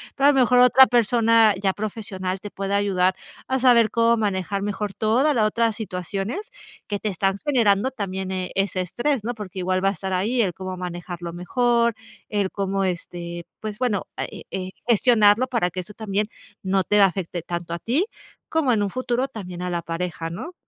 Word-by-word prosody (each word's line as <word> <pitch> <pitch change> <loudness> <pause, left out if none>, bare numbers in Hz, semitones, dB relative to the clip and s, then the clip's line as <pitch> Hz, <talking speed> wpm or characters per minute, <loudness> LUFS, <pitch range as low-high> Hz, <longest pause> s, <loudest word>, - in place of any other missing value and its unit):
pero 275 +1 +4
a - - +7
lo 270 - +2
mejor 250 0 +5
otra 255 +1 +8
persona 230 -2 +4
ya 195 -2 +1
profesional 200 -3 -4
te 205 +2 -8
puede 195 0 -2
ayudar 190 -2 +2 0.3
a 265 - +1
saber 240 -3 +5
cómo 230 +1 +3
manejar 195 -2 -1
mejor 205 0 -3
toda 245 +10 +2
la 225 -4 +2
otra 230 +1 +2
situaciones 200 - -4 0.3
que 205 -1 -3
te 215 - -2
están 195 +1 0
generando 230 -5 +3
también, 190 -6 -4
eh, 185 -1 -3
ese 195 -1 0
estrés, 240 - -1
¿no? 240 +2 -2
Porque 200 -4 -9
igual 185 +1 0
va 195 - +4
a - - +1
estar 190 -1 -4
ahí 210 +7 0
el 185 - -1
cómo 185 +1 -6
manejarlo 175 -1 -6
mejor, 235 +5 +1 0.3
el 205 -3 0
cómo 195 0 -1
este 175 -1 -4
pues, 215 0 -6
bueno, 240 -6 0
eh - - -5
eh 185 -1 -3
eh, 185 - -8 0.2
gestionarlo 230 0 +4
para 220 -9 0
que 185 - -5
eso 190 +3 -8
también 210 -1 -1 0.3
no 190 0 +1
te 210 +3 +3
afecte 185 -2 +1
tanto 170 0 -5
a 170 - -3
ti, 265 - +1 0.4
como 315 -6 +2
en 210 -3 +2
un 200 - -1
futuro, 255 +2 -1
también 180 -7 -8
a 180 - -2
la 170 -1 -1
pareja, 165 0 -4
¿no? 250 - -7
200 Hz, 195 wpm, -23 LUFS, 185-235 Hz, 0.4 s, otra